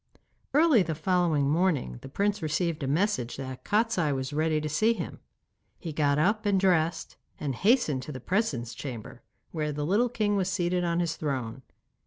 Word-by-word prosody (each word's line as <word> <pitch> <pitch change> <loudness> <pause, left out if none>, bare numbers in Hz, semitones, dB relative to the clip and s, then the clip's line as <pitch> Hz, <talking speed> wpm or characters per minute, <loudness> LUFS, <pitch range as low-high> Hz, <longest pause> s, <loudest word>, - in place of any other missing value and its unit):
Early 300 -7 +6
the 165 -3 -2
following 165 -3 +1
morning 150 - +1
the - - -9
prince 205 +6 0
received 160 +1 -1
a 135 - -2
message 145 - 0
that 130 -1 -7
Kostiei 210 -7 +1
was 130 +2 -4
ready 155 +1 +1
to 155 - -3
see 215 +10 +2
him. - - -6 0.6
He 165 -3 -6
got 145 -1 +2
up 210 +8 +2
and 200 -2 +2
dressed, 175 -3 +1 0.2
and 140 -3 -2
hastened 195 - +2
to 130 - -7
the 130 - -6
presence 130 - -1
chamber, 120 -3 -7 0.3
where 155 -2 -2
the 145 0 -3
little 215 +9 +2
king 215 -3 0
was 190 -2 0
seated 180 -1 0
on 170 0 +1
his 165 -1 -2
throne. 130 -5 -3
160 Hz, 180 wpm, -28 LUFS, 145-195 Hz, 0.6 s, Early